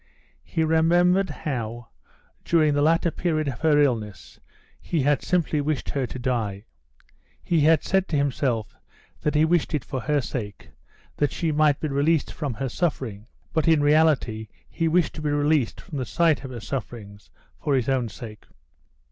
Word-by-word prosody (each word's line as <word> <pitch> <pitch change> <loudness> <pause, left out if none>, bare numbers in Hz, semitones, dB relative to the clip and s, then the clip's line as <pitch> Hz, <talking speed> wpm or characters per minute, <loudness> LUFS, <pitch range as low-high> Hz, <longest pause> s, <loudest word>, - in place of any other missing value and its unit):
He 160 - -1
remembered 175 +4 +3
how, 120 -5 -5 0.5
during 155 -3 +3
the 145 - +1
latter 165 +2 +3
period 155 -3 -1
of 130 -3 -4
her 155 -2 +3
illness, 110 -8 -1 0.4
he 160 -5 -1
had 145 -1 +2
simply 165 -4 0
wished 150 -1 -2
her 135 -3 -1
to 125 - -7
die. 115 -5 -2 0.8
He 170 - +1
had 155 +2 +4
said 190 0 +1
to - - -2
himself 130 -6 -1 0.4
that 150 - -1
he 155 +1 +5
wished 165 -1 +1
it 145 - -3
for 130 -2 -4
her 150 +3 +1
sake, 110 -6 -6 0.5
that 145 -2 +1
she 165 -3 -1
might 150 -1 +3
be 155 - -2
released 145 +2 +1
from 145 -6 -4
her 135 - -3
suffering, 120 - -3 0.3
but 160 +1 +1
in 160 -3 +4
reality 145 -8 +2 0.2
he 165 - -1
wished 170 0 +2
to 155 - -7
be 150 - -1
released 145 -3 +1
from 150 -7 -7
the 130 - -2
sight 165 -1 +2
of 135 - -6
her 120 -3 -7
sufferings 110 -5 -7 0.3
for 145 - 0
his 125 -3 0
own 130 -4 0
sake. 105 0 -10
145 Hz, 175 wpm, -24 LUFS, 125-160 Hz, 0.8 s, he